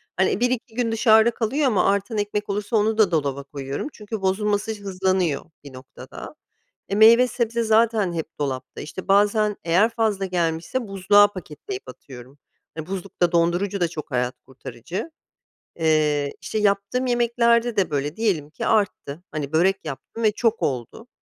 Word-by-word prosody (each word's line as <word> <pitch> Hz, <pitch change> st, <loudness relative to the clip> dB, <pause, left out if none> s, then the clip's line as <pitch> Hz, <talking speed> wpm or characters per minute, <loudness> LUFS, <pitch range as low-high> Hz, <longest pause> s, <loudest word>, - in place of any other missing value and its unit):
Hani, 190 Hz, +3 st, +1 dB
1-2 245 Hz, -1 st, -1 dB
gün 235 Hz, -2 st, 0 dB
dışarıda 220 Hz, 0 st, +5 dB
kalıyor 255 Hz, +7 st, -1 dB
ama 205 Hz, -7 st, +2 dB
artan 200 Hz, +2 st, 0 dB
ekmek 205 Hz, 0 st, -2 dB
olursa 205 Hz, +3 st, -2 dB
onu 220 Hz, +1 st, +1 dB
da 210 Hz, -5 st, +4 dB
dolaba 140 Hz, -4 st, -1 dB
koyuyorum 140 Hz, -, -5 dB
çünkü 210 Hz, -1 st, -7 dB
bozulması 205 Hz, +2 st, 0 dB
hızlanıyor 185 Hz, -5 st, 0 dB, 0.2 s
bir 140 Hz, -2 st, -12 dB
noktada. 130 Hz, +1 st, -11 dB, 0.5 s
E, 195 Hz, -, -1 dB
meyve 230 Hz, +4 st, +7 dB
sebze 235 Hz, -1 st, -1 dB
zaten 220 Hz, -4 st, +2 dB
hep 160 Hz, -1 st, -6 dB
dolapta. 130 Hz, -3 st, -4 dB
İşte, 185 Hz, +4 st, -8 dB
bazen 205 Hz, +1 st, +3 dB
eğer 180 Hz, +7 st, +3 dB
fazla 220 Hz, -4 st, -1 dB
gelmişse 175 Hz, +6 st, -2 dB
buzluğa 200 Hz, +1 st, +5 dB
paketleyip 205 Hz, -, -8 dB
atıyorum. 130 Hz, +1 st, -13 dB, 0.4 s
Hani, 160 Hz, 0 st, -6 dB
buzluk 195 Hz, 0 st, -7 dB
da, 175 Hz, -1 st, +4 dB
dondurucu 175 Hz, +3 st, +1 dB
da 175 Hz, -, +3 dB
çok 155 Hz, -2 st, -8 dB
hayat 125 Hz, 0 st, -1 dB
kurtarıcı. 135 Hz, -, -7 dB, 0.6 s
Eee, 155 Hz, -3 st, +1 dB
işte, 215 Hz, -, -3 dB
yaptığım 200 Hz, +5 st, 0 dB
yemeklerde 235 Hz, -1 st, +2 dB
de 185 Hz, -5 st, +1 dB
böyle. 145 Hz, +2 st, -2 dB
Diyelim 185 Hz, -10 st, -1 dB
ki -, -, -6 dB
arttı, 185 Hz, -7 st, -1 dB
hani, 150 Hz, -1 st, -5 dB
börek 190 Hz, +4 st, +2 dB
yaptım 155 Hz, +10 st, -7 dB
ve 215 Hz, -, +4 dB
çok 230 Hz, +1 st, 0 dB
oldu, 130 Hz, -, -3 dB
195 Hz, 155 wpm, -23 LUFS, 160-220 Hz, 0.6 s, meyve